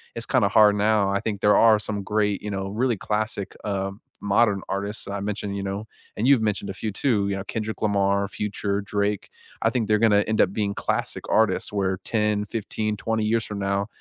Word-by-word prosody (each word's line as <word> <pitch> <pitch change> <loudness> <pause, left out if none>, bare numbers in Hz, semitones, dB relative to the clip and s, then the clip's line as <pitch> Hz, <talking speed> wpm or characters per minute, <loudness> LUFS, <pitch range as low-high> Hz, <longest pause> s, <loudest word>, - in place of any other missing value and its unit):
it's - - -5
kinda 100 - +2
hard 105 -2 +6
now, 105 -1 +2
I 100 - +1
think 105 -1 -3
there 105 - +5
are 115 -1 +6
some 105 -1 -4
great, 105 0 0
you 105 - -5
know, 95 -1 -3
really 115 +3 0
classic, 105 -1 -3
um, 100 0 -3 0.2
modern 100 0 +3
artists 100 +2 -3
that 100 - -6
I 100 - -2
mentioned, 100 0 -3
you 100 - -3
know, 100 +3 -4 0.3
and 115 - 0
you've 135 -5 +5
mentioned 105 -1 -1
a 95 - -5
few 105 +3 -3
too, 105 -1 +1
you 100 - -1
know, 95 - -4
Kendrick 110 0 -4
Lamar, 100 -1 +2
Future, 100 0 -2
Drake. 100 0 -2 0.3
I - - +3
think 120 -4 -1
they're 105 - +3
gonna 105 -2 +4
end 110 0 0
up 95 - +3
being 100 -2 -1
classic - - -2
artists, - - +1
where 95 -2 0
10, 105 -2 0
15, 105 0 -3
20 110 +1 -1
years 110 +1 +1
from 105 - -6
now, 100 +1 -1
105 Hz, 215 wpm, -24 LUFS, 100-110 Hz, 0.3 s, hard